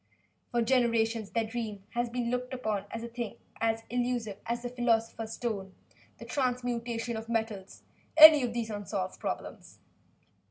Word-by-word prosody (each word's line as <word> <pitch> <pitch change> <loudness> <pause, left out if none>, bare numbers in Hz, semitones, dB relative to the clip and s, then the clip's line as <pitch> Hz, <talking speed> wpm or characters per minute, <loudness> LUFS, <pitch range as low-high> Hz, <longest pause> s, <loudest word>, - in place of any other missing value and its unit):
For 240 -1 +1
generations 230 -3 +2
their 230 -1 0
dream 220 -3 -5
has 240 0 -1
been 240 0 -2
looked 250 +1 -2
upon 215 -5 -2
as 230 - -5
a - - -4
thing 235 -2 -5 0.6
elusive 240 -4 -1
as 235 +1 -2
the 245 - -3
philosopher's 225 -2 0
stone, 200 -5 -4 0.4
the - - -10
transmutation 245 -3 -2
of 220 +1 -6
metals 220 -4 -3 0.3
any 310 -2 +11
of 245 -2 -1
these 230 -1 -3
unsolved 200 -2 -4
problems. - - -5
235 Hz, 145 wpm, -30 LUFS, 220-245 Hz, 0.6 s, any